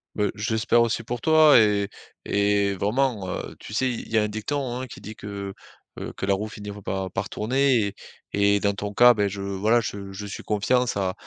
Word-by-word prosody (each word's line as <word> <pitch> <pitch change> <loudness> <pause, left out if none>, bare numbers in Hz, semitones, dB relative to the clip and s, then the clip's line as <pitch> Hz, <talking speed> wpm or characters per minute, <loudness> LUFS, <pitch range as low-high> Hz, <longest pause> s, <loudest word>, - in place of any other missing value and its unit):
Beh, 105 -1 +1
j'espère 110 +2 +2
aussi 115 0 0
pour 120 +1 -5
toi 155 -1 +6
et 105 -3 +3 0.4
et 100 0 +2
vraiment, 105 0 0
heu, - - -5
tu - - -9
sais, 130 +4 +1
il 120 - -5
y 115 - +1
a 110 - +4
un - - 0
dicton, 125 +4 -3
hein, - - -4
qui - - -11
dit 110 +2 -9
que, 100 -1 -6 0.5
heu, - - -5
que - - -2
la 100 - +2
roue 105 +3 -2
finit 105 -2 -8
v 105 0 -8
par 95 0 -3
par 95 +2 -3
tourner 130 +4 +2
et 100 - -7 0.4
et 100 0 +3
dans 100 0 +1
ton 100 +1 -5
cas, 120 +3 +7
beh, 105 -3 0
je, 100 0 -6
voilà, 100 +4 +2
je 100 -3 -5
je 95 +2 -7
suis 100 - -7
confiant, 115 +4 +1
ça 95 -5 -1
105 Hz, 225 wpm, -25 LUFS, 100-120 Hz, 0.5 s, cas